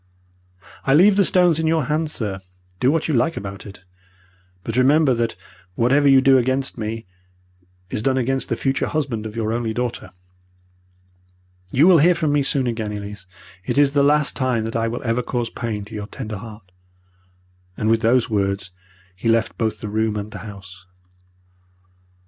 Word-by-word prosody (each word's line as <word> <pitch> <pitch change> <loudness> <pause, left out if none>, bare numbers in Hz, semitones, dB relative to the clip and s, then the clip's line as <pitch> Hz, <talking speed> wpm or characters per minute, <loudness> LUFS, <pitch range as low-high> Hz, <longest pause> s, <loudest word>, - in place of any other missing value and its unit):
I 135 - +3
leave 190 +5 +6
the 200 - +4
stones 175 -3 +3
in 160 - 0
your 160 -1 +2
hands, 150 +3 -1
sir. 100 -8 -4 0.4
Do 125 - +3
what 160 +2 0
you 155 - -1
like 150 +7 +1
about 100 +1 -7
it. 100 -2 -13 0.8
But 115 - -4
remember 135 +2 +4
that 115 -1 -1 0.4
whatever 140 +6 +3
you 135 -1 +6
do 135 0 +5
against 130 +2 0
me, 110 -1 -5 0.9
is - - -2
done 130 +3 +1
against 135 +1 0
the - - 0
future 135 0 -1
husband 130 -8 -2
of 105 - -10
your 110 -1 -1
only 115 -2 -2
daughter. 125 -1 -3 1.6
You 140 +5 +4
will 180 -4 +7
hear 175 +4 +5
from 160 -3 0
me 145 - +3
soon 135 -1 0
again, 110 -3 -3
Elise. 105 -1 -7 0.4
It - - -3
is 145 -1 +5
the 145 0 +2
last 145 +1 +3
time 125 -4 0
that 115 - -5
I 115 0 0
will 115 +1 -4
ever 115 0 0
cause 120 -1 -3
pain 105 -4 -4
to 105 - -13
your 105 -1 -5
tender 105 -1 -6
heart,' 105 -2 -12 1.1
and 110 - -1
with 115 0 +3
these 120 +2 +3
words 100 -2 -2 0.4
he 115 +5 -2
left 115 -1 +1
both 110 -2 -1
the 105 - -5
room 110 +1 -1
and 105 +1 -5
the 105 - -8
house. 95 -3 -11
115 Hz, 180 wpm, -21 LUFS, 110-140 Hz, 1.6 s, will